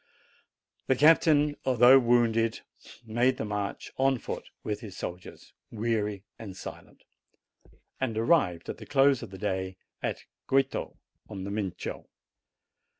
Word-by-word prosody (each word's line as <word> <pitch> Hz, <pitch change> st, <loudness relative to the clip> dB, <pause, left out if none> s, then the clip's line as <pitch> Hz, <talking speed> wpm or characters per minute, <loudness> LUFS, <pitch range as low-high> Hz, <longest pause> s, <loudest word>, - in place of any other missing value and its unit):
The 130 Hz, -, +3 dB
captain, 150 Hz, 0 st, +4 dB
although 130 Hz, +1 st, +7 dB
wounded, 115 Hz, -2 st, +2 dB, 0.4 s
made 120 Hz, +3 st, +1 dB
the -, -, -3 dB
march 105 Hz, -1 st, -4 dB
on 135 Hz, 0 st, +3 dB
foot -, -, -6 dB
with 105 Hz, -1 st, -3 dB
his 105 Hz, -6 st, -10 dB
soldiers, 90 Hz, +1 st, -8 dB, 0.2 s
weary 105 Hz, -3 st, -2 dB, 0.2 s
and 100 Hz, -4 st, -8 dB
silent, -, -, -10 dB, 1.0 s
and 120 Hz, -4 st, -2 dB
arrived 115 Hz, -, +2 dB
at -, -, -5 dB
the -, -, -10 dB
close 135 Hz, -2 st, +4 dB
of -, -, -7 dB
the 95 Hz, -, -10 dB
day 95 Hz, -2 st, -3 dB, 0.2 s
at -, -, -3 dB, 0.2 s
Goito, 135 Hz, 0 st, 0 dB, 0.3 s
on 100 Hz, -3 st, -6 dB
the 100 Hz, -, -5 dB
Mincio. 100 Hz, -3 st, -4 dB
115 Hz, 130 wpm, -28 LUFS, 100-130 Hz, 1.0 s, although